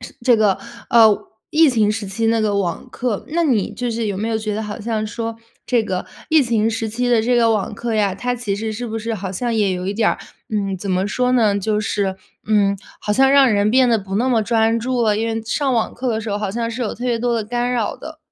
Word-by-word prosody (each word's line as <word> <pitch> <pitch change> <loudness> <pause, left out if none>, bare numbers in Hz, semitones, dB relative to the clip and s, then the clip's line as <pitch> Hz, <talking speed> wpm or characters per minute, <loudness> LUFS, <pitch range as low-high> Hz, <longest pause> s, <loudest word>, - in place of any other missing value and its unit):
是 245 - -10
这 240 -1 +5
个， 210 -3 +2 0.3
呃， 220 -3 +7 0.3
疫 315 -1 +5
情 220 -4 +2
时 215 -1 -3
期 225 +4 -2
那 225 0 +2
个 205 -2 +1
网 180 +5 -3
课。 240 -5 -3
那 335 +2 0
你 235 - +1
就 245 -1 -3
是 225 -1 -2
有 200 - -2
没 220 +2 -2
有 225 - 0
觉 215 -1 -3
得 220 - -2
好 210 0 -6
像 215 -1 -2
说 225 +1 -4 0.3
这 245 -2 +2
个 185 -4 -3 0.2
疫 315 -2 +5
情 225 -2 +1
时 225 0 -2
期 245 +3 -1
的 235 -2 +3
这 245 +2 +2
个 230 -1 +4
网 215 -1 -1
课 235 +2 -3
呀， 205 -3 +1
它 245 +5 -2
其 225 -5 -3
实 220 +2 -3
是 240 +3 -5
不 225 0 -4
是 225 +1 -3
好 190 -2 -5
像 235 +5 -2
也 205 -3 +2
有 180 0 -4
一 200 - -2
点 220 +1 +2
儿， - - -3 0.3
嗯， 200 -3 -1
怎 190 +1 -5
么 185 +2 +1
说 250 +3 +1
呢， 215 -5 +3
就 210 +1 0
是， 200 -2 -1 0.3
嗯， 205 -2 +2 0.2
好 - - -4
像 270 +4 +4
让 275 -2 +6
人 205 +1 +2
变 255 +1 +4
得 230 -2 +3
不 195 -1 -4
那 245 +5 +1
么 230 -4 +2
专 225 +1 +2
注 250 +2 -1
了。 210 -2 +2
因 225 +2 -1
为 225 0 -2
上 270 +4 -1
网 230 -2 0
课 260 - -5
的 220 -1 -1
时 225 - -6
候， 205 - 0
好 210 -2 -2
像 230 +2 -2
是 240 +2 -4
有 220 - -2
特 245 - -7
别 235 -2 +1
多 240 0 0
的 225 - 0
干 245 +3 -1
扰 235 -4 -1
的。 315 0 -10
225 Hz, 290 characters per minute, -20 LUFS, 210-240 Hz, 0.3 s, 呃